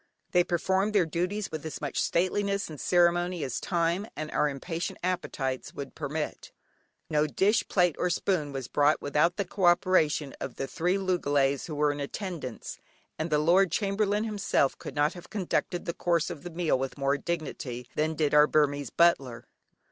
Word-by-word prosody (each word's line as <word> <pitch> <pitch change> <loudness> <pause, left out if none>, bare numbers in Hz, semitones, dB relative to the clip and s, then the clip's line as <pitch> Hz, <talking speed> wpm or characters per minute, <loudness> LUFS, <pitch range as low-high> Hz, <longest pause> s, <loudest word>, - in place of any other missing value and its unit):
They 180 -1 +4
performed 190 +4 0
their 190 -4 +5
duties 180 +6 -2
with 155 -2 -5
as 160 - -5
much 145 -2 -2
stateliness 200 +1 0
and 150 - -8
ceremony 175 -1 +2
as 130 - -2
time, 175 +3 0
and 155 0 -5
our 150 - +2
impatient 165 +5 -4
appetites 135 -7 -2
would 140 -1 -6
permit. 150 0 -4 0.6
No 150 0 +3
dish, 195 - +2
plate, 180 -4 +2
or 180 - +1
spoon 170 -4 0
was 135 -3 -5
brought 145 +1 +3
without 150 +5 +1
the 200 - 0
co 185 +1 -1
operation 160 -5 +3
of - - -5
the 135 - -3
three 180 +7 0
loogalays 145 -8 +1
who 155 - -5
were 150 0 +2
in 145 - -5
attendance, 150 - -5 0.4
and 160 +2 -1
the 150 - +3
lord 175 +4 +4
chamberlain 205 +2 +1
himself 205 -10 +1
could - - -8
not 150 +2 +2
have 175 -1 -12
conducted 180 -2 -2
the 170 - -2
course 170 0 0
of 160 -5 -7
the 175 - -7
meal 165 -5 0
with 135 +2 -4
more 140 0 +1
dignity 140 -6 -4
than 155 +1 0
did 150 -2 0
our 150 0 +7
Burmese 145 -2 +1
butler. 135 -9 +2
165 Hz, 180 wpm, -28 LUFS, 145-180 Hz, 0.6 s, our